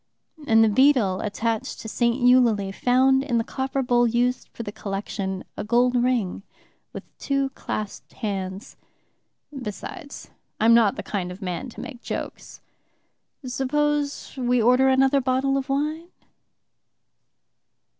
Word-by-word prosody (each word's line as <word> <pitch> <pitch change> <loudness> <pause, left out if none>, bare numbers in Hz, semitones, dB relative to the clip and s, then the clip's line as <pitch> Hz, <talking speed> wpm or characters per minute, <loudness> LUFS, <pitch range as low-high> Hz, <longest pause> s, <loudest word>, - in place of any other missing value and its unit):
And 225 0 +6
the - - +5
beadle 220 -5 +3
attached 220 +1 -2
to - - -8
St. 235 +1 +1
Eulalie 240 -6 +4
found 260 +5 +3
in 250 -4 0
the 230 - +1
copper 265 +2 -2
bowl 240 -1 +3
used 245 +2 0
for 235 - -8
the 205 - -6
collection 195 -2 -4
a - - -4
gold 240 +3 +2
ring 240 -8 0 0.5
with - - -8 0.2
two 275 -1 0
clasped 215 -5 -6
hands. 195 -3 -5 0.8
Besides, 250 - -8 0.3
I'm 225 +1 +5
not 225 -4 +4
the - - -6
kind 180 -4 -3
of 190 +3 -9
man 185 +8 -4
to - - -10
make 250 -4 -9
jokes. - - -6 0.8
Suppose 290 +3 -1
we 250 -1 +1
order 250 +3 +4
another 270 +1 +3
bottle 260 +2 +1
of 275 0 -2
wine?..." 305 +4 -1
245 Hz, 135 wpm, -24 LUFS, 215-265 Hz, 0.8 s, And